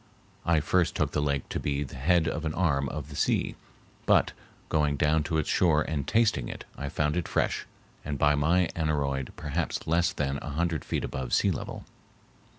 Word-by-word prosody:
I 85 -2 +4
first 90 +2 +1
took - - 0
the 75 - 0
lake 70 -2 -1
to - - -2
be 70 0 -1
the 65 - -9
head 85 +5 +2
of 80 0 -2
an 80 -1 -2
arm 70 -7 +1
of 75 +1 -6
the 75 - -9
sea, - - +1 0.5
but, - - +4 0.4
going 75 -2 +1
down 75 +2 +3
to 80 +1 0
its 80 - 0
shore 75 -4 +3
and 75 -4 -3
tasting 110 - +2
it, - - -7
I 70 0 -4
found 75 +2 0
it 90 -2 -1
fresh, - - 0 0.4
and 70 -1 -3
by 75 +2 +4
my 80 +5 +3
aneroid 70 -5 -1
perhaps 75 +2 -3
less 85 +1 +2
than 70 -1 -2
a - - -6
hundred 80 +1 -1
feet - - -2
above 65 -2 -4
sea - - +4
level. - - -5
75 Hz, 195 wpm, -28 LUFS, 70-80 Hz, 0.5 s, I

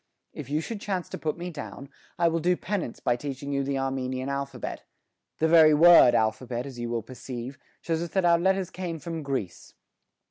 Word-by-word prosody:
"If 140 -3 -8
you 150 +2 0
should 215 +3 -6
chance 190 -4 -3
to - - -5
put 155 0 -2
me 175 +1 -5
down, 145 -2 -8 0.3
I 170 - +3
will 165 0 +1
do 180 +2 +2
penance 190 - -3
by 120 - +1
teaching 140 +2 -5
you 140 0 0
the 135 0 -1
Armenian 130 0 -2
alphabet 140 0 -4 0.5
the 160 - +2
very 160 -2 +7
word 170 -5 +8
alphabet, 120 +3 -1
as 130 -3 -9
you 120 0 -3
will 115 -2 -2
perceive, 130 +1 -8 0.2
shows 165 -1 -1
us 170 - -4
that 190 -2 +2
our 170 -1 +5
letters 190 0 +1
came 175 -3 -4
from 165 +1 -5
Greece. 130 - -5
145 Hz, 200 wpm, -27 LUFS, 130-170 Hz, 0.5 s, word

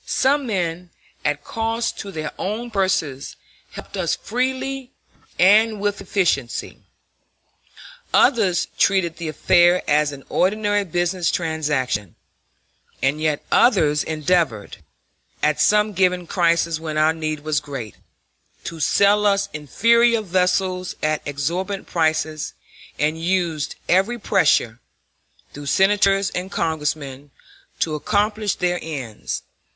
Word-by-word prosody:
Some 275 0 +1
men, 180 -4 -2 0.3
at 145 0 -1
cost 225 +1 -2
to 200 - -6
their 155 -3 -4
own 230 +5 -3
purses, 185 -9 -1 0.4
helped - - -9
us 180 -4 0
freely 260 +3 -3 0.5
and 215 +4 +5
with 205 0 -2
efficiency; 175 - -1 1.3
others 200 -9 +3
treated 180 -4 +2
the 170 - -5
affair 175 +3 +3
as 150 0 +2
an 140 -1 -10
ordinary 205 +2 +1
business 175 +1 0
transaction; 145 - -1 0.9
and 140 +3 +1
yet 155 -2 -1
others 155 - +4
endeavored, 155 - -1 0.7
at 150 0 +2
some 210 0 +3
given 180 -1 +1
crisis 170 -2 +1
when 155 -1 -4
our 155 +1 +3
need 155 -2 -4
was 155 -1 0
great, 135 -8 -7 0.7
to 165 - -7
sell 200 +6 +3
us 200 0 +1
inferior 230 - +3
vessels 185 0 0
at 155 0 0
exorbitant 175 +8 -3
prices, 155 -2 -1 0.4
and 155 +2 0
used 170 -4 -1
every 195 +7 +2
pressure, 180 - +2 0.7
through 145 0 -8
Senators 195 +2 +3
and 180 +1 -4
Congressmen, 145 -4 -3 0.5
to 160 - 0
accomplish 210 +6 0
their 180 0 0
ends. 135 -9 -5
175 Hz, 115 wpm, -21 LUFS, 155-200 Hz, 1.3 s, and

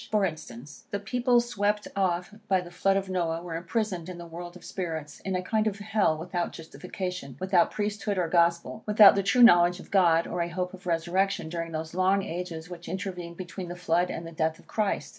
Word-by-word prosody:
For 210 -2 +2
instance, 150 -5 -7
the 200 - -2
people 245 +4 +2
swept 210 -3 -1
off 180 0 0
by 190 -2 +3
the 175 -1 -8
flood 195 +2 +2
of 195 0 -2
Noah, 170 -3 -1
were 170 -2 -5
imprisoned 180 0 -2
in 180 - -7
the 170 - -8
world 175 +1 -8
of 180 - -13
spirits, 160 -5 -5
in 190 -1 -3
a 185 - -1
kind 220 +3 +1
of 200 -2 -1
hell; 205 -6 +1
without 175 +2 -3
justification, 180 -4 -6
without 185 -2 +3
Priesthood 205 -1 -2
or 180 -2 +1
Gospel, 170 +4 +1
without 210 -1 +8
the 200 - +1
true 220 +6 +4
knowledge 175 -4 +7
of - - -13
God, 170 -4 +4
or 180 - -3
a 170 - -1
hope 180 +1 -3
of 185 0 -11
resurrection, 175 +1 0
during 165 0 -4
those 160 0 -5
long 190 +2 +2
ages 170 -2 -5
which 175 -1 -9
intervened 180 -2 -5
between 185 0 -6
the 175 - -6
flood 175 0 +1
and 165 - -5
the 165 - -8
death 160 0 -1
of - - -19
Christ. 210 -2 -1
180 Hz, 215 wpm, -27 LUFS, 170-195 Hz, -, without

